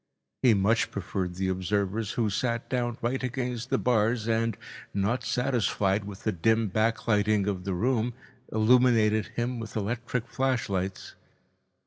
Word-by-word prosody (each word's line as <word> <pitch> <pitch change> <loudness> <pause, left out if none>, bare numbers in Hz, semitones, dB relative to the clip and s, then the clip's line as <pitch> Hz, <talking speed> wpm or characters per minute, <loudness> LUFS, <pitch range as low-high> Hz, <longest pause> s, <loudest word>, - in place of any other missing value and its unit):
He 120 -4 +5
much 105 +4 +2
preferred 95 -2 -3
the 95 +1 -1
observers 100 +3 -1
who 115 -2 +1
sat 115 +3 -1
down 120 -2 -1
right 125 +3 0
against 125 -1 -3
the 135 - +2
bars 115 -2 +1
and, 115 -1 +1 0.4
not 110 +6 0
satisfied 110 -6 0
with 100 -2 -9
the 110 - +1
dim 110 +4 +2
backlighting 110 -1 +2
of 95 -3 -2
the 95 -2 -1
room, 120 +3 0 0.4
illuminated 110 -2 +4
him 120 +1 -1
with 110 -1 -7
electric 120 +3 -2
flashlights. 100 -8 -2
110 Hz, 135 wpm, -28 LUFS, 100-120 Hz, 0.4 s, He